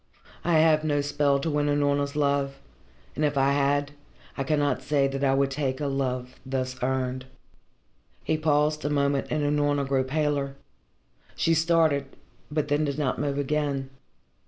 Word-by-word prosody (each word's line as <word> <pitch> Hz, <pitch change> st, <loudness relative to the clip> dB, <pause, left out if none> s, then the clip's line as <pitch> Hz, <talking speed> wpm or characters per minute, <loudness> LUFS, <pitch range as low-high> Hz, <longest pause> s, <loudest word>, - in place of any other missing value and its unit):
I 170 Hz, -, +1 dB
have 155 Hz, -1 st, +4 dB
no 145 Hz, -2 st, +1 dB
spell 145 Hz, -1 st, +1 dB
to 165 Hz, -, -1 dB
win 145 Hz, 0 st, +1 dB
Unorna's 145 Hz, 0 st, +1 dB
love 140 Hz, -1 st, 0 dB, 0.6 s
and 155 Hz, -, -1 dB
if 145 Hz, -1 st, +1 dB
I 135 Hz, 0 st, +3 dB
had, 145 Hz, 0 st, +1 dB, 0.4 s
I 135 Hz, -, -2 dB
cannot 145 Hz, 0 st, 0 dB
say 140 Hz, -2 st, +1 dB
that 135 Hz, 0 st, -3 dB
I 135 Hz, -1 st, +3 dB
would 135 Hz, 0 st, +1 dB
take 135 Hz, -1 st, -2 dB
a 150 Hz, -, -2 dB
love 130 Hz, -2 st, -2 dB
thus 130 Hz, -1 st, -3 dB
earned." 130 Hz, 0 st, -1 dB, 1.0 s
He -, -, 0 dB
paused 150 Hz, 0 st, +1 dB
a 145 Hz, -, 0 dB
moment 140 Hz, -1 st, +1 dB
and 155 Hz, -1 st, -1 dB
Unorna 145 Hz, -1 st, +1 dB
grew 135 Hz, -1 st, +1 dB
paler. 140 Hz, 0 st, -1 dB, 0.8 s
She 165 Hz, -, +2 dB
started, 160 Hz, -4 st, +2 dB, 0.4 s
but 150 Hz, 0 st, -1 dB
then 145 Hz, +1 st, +1 dB
did 140 Hz, -1 st, -2 dB
not 140 Hz, -4 st, -1 dB
move 140 Hz, -1 st, -1 dB
again. 140 Hz, -2 st, -1 dB
145 Hz, 160 wpm, -26 LUFS, 135-150 Hz, 1.0 s, have